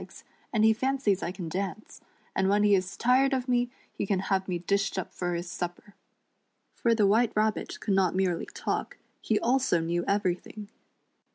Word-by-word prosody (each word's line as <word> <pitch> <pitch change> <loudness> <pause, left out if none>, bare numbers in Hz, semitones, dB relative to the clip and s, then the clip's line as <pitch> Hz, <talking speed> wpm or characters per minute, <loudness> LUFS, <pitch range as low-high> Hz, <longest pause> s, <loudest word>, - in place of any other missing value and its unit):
c^s, - - -12 0.3
and 220 -2 +3
he 220 - +6
fancies 255 -5 0
I 175 - -2
can 180 -3 -6
dance; 195 +5 -5 0.3
and 190 - +2
when 205 +1 +3
he 205 -1 +5
is 185 -1 0
tired 260 +3 +3
of 260 -1 -1
me 245 -1 +2 0.2
he - - -3
can 195 - +1 0.2
have 190 0 0
me 180 -2 -1
dished 195 +3 0
up 190 - -4
for 175 -1 -2
his 170 +1 -4
supper." 175 +3 -6 0.8
For 230 -1 +1
the 215 -2 +3
Wiiite 220 +4 +3
Rabbit 215 0 0
could 200 - -1
not 190 -2 +2
merely 185 -3 0
talk, - - -3 0.2
he 215 - +1
also 250 -7 +2
knew 170 +1 -1
everything. 200 +1 -2
200 Hz, 185 wpm, -28 LUFS, 185-220 Hz, 0.8 s, he